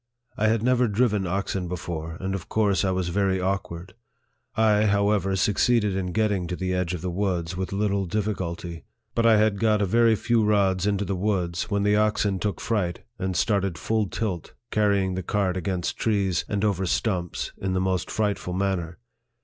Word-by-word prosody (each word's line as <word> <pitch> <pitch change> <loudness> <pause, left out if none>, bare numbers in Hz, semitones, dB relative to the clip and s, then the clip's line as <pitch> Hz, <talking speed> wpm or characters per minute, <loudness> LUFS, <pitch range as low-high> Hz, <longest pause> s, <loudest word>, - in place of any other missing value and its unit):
I 110 - +1
had 110 0 +1
never 125 0 +3
driven 105 -3 +1
oxen 95 0 -2
before, 80 -2 -5
and 95 0 -3
of 95 -3 -5
course 100 -6 +2
I 95 - +1
was 95 -1 -1
very 95 +1 +1
awkward. 90 -1 -3 0.6
I, 110 -1 +3
how 100 0 +3
ever, 95 -2 +1
succeeded 105 +2 +2
in 90 -2 -2
getting 100 -3 0
to 90 - -3
the 90 0 -2
edge 90 -1 -1
of 85 - -7
the 90 0 -3
woods 90 -2 -1
with 95 0 -3
little 100 -1 0
difficulty; 85 -4 -3 0.3
but 115 0 +2
I 110 -1 +6
had 105 -1 +2
got 110 -2 +3
a 100 - +2
very 115 +3 +4
few 115 +1 +1
rods 100 -2 +2
into 100 0 0
the 95 - -2
woods, 90 -3 -1
when 100 -2 0
the 105 +1 +3
oxen 105 -2 +1
took 100 -2 -2
fright, 95 -7 -1 0.2
and 95 -1 -2
started 100 -5 +1
full 110 +4 0
tilt, 95 -5 -4 0.2
carrying 100 -3 +2
the 95 - -2
cart 95 0 0
against 90 -1 -2
trees, 100 -5 +1
and 100 +1 0
over 95 -3 0
stumps, 90 -3 -1
in 95 -1 -2
the 95 - +1
most 95 -1 -1
frightful 105 -4 -1
manner. 90 -3 -1
95 Hz, 190 wpm, -25 LUFS, 90-105 Hz, 0.6 s, I